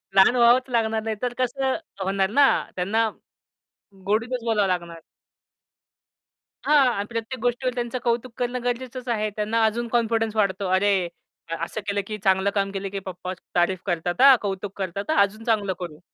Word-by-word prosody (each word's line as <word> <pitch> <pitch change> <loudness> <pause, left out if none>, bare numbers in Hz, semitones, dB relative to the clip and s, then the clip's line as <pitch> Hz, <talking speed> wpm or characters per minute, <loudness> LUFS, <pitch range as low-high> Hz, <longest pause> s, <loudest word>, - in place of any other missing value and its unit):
लहान 195 +6 +6
व्हावंच 245 +2 +4
लागणार 220 -2 0
नाही 220 -1 -2
तर 245 -1 -1
कसं 260 +1 0 0.3
होणार 195 0 +1
ना, 280 +4 +5 0.3
त्यांना 220 +5 +1 1.0
गोडीतच 230 +4 0
बोलावं 210 -4 +2
लागणार. 170 -2 -3 1.7
हां, 295 -3 +5
आणि 200 +1 -2
प्रत्येक 230 +2 -4
गोष्टीवर 245 +1 0
त्यांचं 240 0 -2
कौतुक 235 +1 0
करणं 245 0 -2
गरजेचंच 250 +1 -4
आहे. 215 -2 0
त्यांना 220 +2 0
अजून 235 +2 -1
कॉन्फिडन्स 225 -1 0
वाढतो. 200 -2 0
अरे! 200 +2 +3 0.6
अ, 165 - -2
"असं 220 - -6
केलं, 200 0 0
की 215 -1 -4
चांगलं 190 0 +3
काम 195 0 0
केलं, 195 0 -4
की 200 - -3
पप्पा 185 0 -5 0.2
तारीफ 175 +1 +2
करतात 175 +2 -1
हां, 270 -1 +9
कौतुक 200 0 -4
करतात 195 - -4
हां, - - +1
अजून 210 +3 0
चांगलं 210 -5 +1
करू 165 -4 -7
220 Hz, 165 wpm, -24 LUFS, 195-240 Hz, 1.7 s, हां